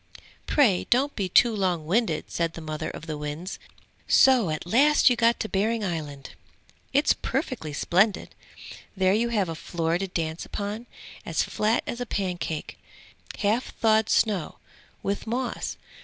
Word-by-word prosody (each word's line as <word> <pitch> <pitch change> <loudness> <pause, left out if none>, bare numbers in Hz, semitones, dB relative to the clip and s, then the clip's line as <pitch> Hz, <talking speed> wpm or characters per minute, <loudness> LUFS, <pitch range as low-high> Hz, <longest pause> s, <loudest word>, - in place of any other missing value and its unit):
'Pray 230 -12 +3
don't 275 +4 +2
be 195 -3 -2
too 230 +4 +5
long 180 -6 0
winded,' 185 -1 0
said 165 -1 -1
the - - -8
mother 155 -1 -4
of - - -8
the 155 -3 -5
winds. 150 +5 -5 0.5
'So 255 -9 +5
at 155 +1 -3
last 270 +8 +5
you - - +3
got 235 0 +3
to - - -2
Behring 215 +3 0
Island!' 150 -7 -5 0.6
'It's - - +4
perfectly 155 - -3
splendid! 190 +8 +1 0.6
There 185 0 +3
you 235 +3 +1
have 210 -5 +1
a 165 - -3
floor 165 +1 -2
to 195 - -2
dance 165 -2 -3
upon, 210 +4 -5 0.4
as - - 0
flat 220 +3 0
as 240 - -5
a 245 - -3
pancake, 180 -6 -3 0.6
half 220 +4 0
thawed 220 -1 +3
snow, 200 -8 +1 0.5
with 200 +3 -2
moss. 245 +2 -3
195 Hz, 155 wpm, -26 LUFS, 165-230 Hz, 0.6 s, too